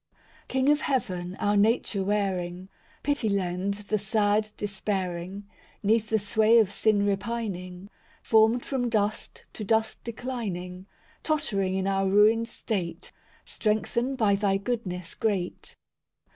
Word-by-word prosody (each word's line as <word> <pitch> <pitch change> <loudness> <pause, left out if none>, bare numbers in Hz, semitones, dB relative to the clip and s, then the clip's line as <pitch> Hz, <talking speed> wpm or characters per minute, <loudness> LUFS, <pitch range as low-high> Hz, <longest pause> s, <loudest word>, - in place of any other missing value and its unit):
I - - -37 0.3
King 265 +1 +1
of 295 0 +4
heaven, 185 -9 -2
our 205 +1 +1
nature 205 -1 +2
wearing, 190 -2 -1 0.3
Pity 285 -6 +1
lend 190 0 -1
the 210 +1 -2
sad 210 +1 +1
despairing; 195 -1 -3 0.4
'Neath 220 +1 +2
the 220 - +3
sway 215 +2 +3
of 215 -4 +4
sin 205 0 +2
repining, 200 -3 -3 0.4
Formed 225 +2 +4
from 250 -3 -1
dust, 215 -1 -2
to 215 - -6
dust 220 +1 0
declining— 200 -7 -5 0.3
Tottering 205 -12 0
in 190 0 -1
our 195 0 +1
ruined 215 +3 +4
state, 185 -7 -4 0.3
Strengthen 235 +4 -1
by 215 -5 +3
Thy 195 -1 +1
goodness 195 -6 -4
great. 195 -5 -2
205 Hz, 125 wpm, -27 LUFS, 190-225 Hz, 0.4 s, of